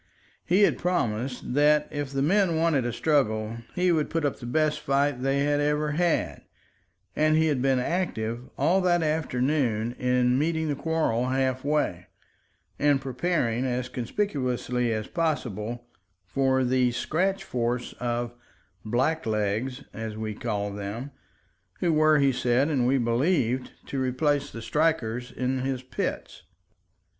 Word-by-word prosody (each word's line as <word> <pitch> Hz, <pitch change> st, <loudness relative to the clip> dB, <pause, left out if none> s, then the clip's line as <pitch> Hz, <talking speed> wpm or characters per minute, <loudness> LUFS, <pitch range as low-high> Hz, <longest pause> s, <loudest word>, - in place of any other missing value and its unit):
He 190 Hz, +4 st, +3 dB
had -, -, +3 dB
promised 125 Hz, -8 st, -1 dB
that 150 Hz, +1 st, +4 dB
if 145 Hz, -2 st, -4 dB
the 135 Hz, 0 st, 0 dB
men 185 Hz, +1 st, +3 dB
wanted 160 Hz, -6 st, +2 dB
a -, -, -1 dB
struggle 115 Hz, -5 st, 0 dB, 0.2 s
he 180 Hz, 0 st, +2 dB
would 155 Hz, -3 st, +1 dB
put 165 Hz, -2 st, -1 dB
up 140 Hz, -, -1 dB
the 120 Hz, -, -7 dB
best 155 Hz, +3 st, +1 dB
fight 140 Hz, -1 st, +1 dB
they 135 Hz, +1 st, +1 dB
had 145 Hz, 0 st, +1 dB
ever 150 Hz, +1 st, +1 dB
had, 170 Hz, +2 st, 0 dB, 0.7 s
and 155 Hz, 0 st, +3 dB
he 160 Hz, -, +3 dB
had 145 Hz, -5 st, +1 dB
been 135 Hz, 0 st, +3 dB
active 125 Hz, -6 st, -2 dB
all 190 Hz, +3 st, +3 dB
that 175 Hz, -2 st, +2 dB
afternoon 130 Hz, -6 st, 0 dB
in 125 Hz, 0 st, +2 dB
meeting 160 Hz, +1 st, 0 dB
the 145 Hz, -, 0 dB
quarrel 145 Hz, -6 st, 0 dB
half 130 Hz, 0 st, 0 dB
way, 140 Hz, -12 st, 0 dB, 0.7 s
and 145 Hz, -1 st, +3 dB
preparing 130 Hz, -2 st, -1 dB
as 125 Hz, -1 st, -2 dB
conspicuously 125 Hz, -, -1 dB
as 110 Hz, -1 st, -2 dB
possible 120 Hz, -, -2 dB, 0.4 s
for 130 Hz, +5 st, +1 dB
the 125 Hz, 0 st, +2 dB
scratch 190 Hz, +10 st, 0 dB
force 120 Hz, 0 st, -2 dB
of 120 Hz, 0 st, -2 dB, 0.5 s
"blacklegs"—as 115 Hz, -2 st, -2 dB
we 110 Hz, -1 st, -3 dB
called 105 Hz, -2 st, -3 dB
them—who 110 Hz, -, -6 dB
were, 155 Hz, 0 st, +5 dB
he 140 Hz, -1 st, +4 dB
said 125 Hz, +3 st, +1 dB
and 130 Hz, -5 st, +1 dB
we 135 Hz, +2 st, +3 dB
believed, 125 Hz, +1 st, +1 dB
to 135 Hz, -, -3 dB
replace 140 Hz, +3 st, 0 dB
the 115 Hz, -, -8 dB
strikers 125 Hz, -5 st, 0 dB
in 130 Hz, +1 st, -1 dB
his 130 Hz, -1 st, -2 dB
pits. 130 Hz, -, -4 dB
130 Hz, 140 wpm, -26 LUFS, 120-155 Hz, 0.7 s, were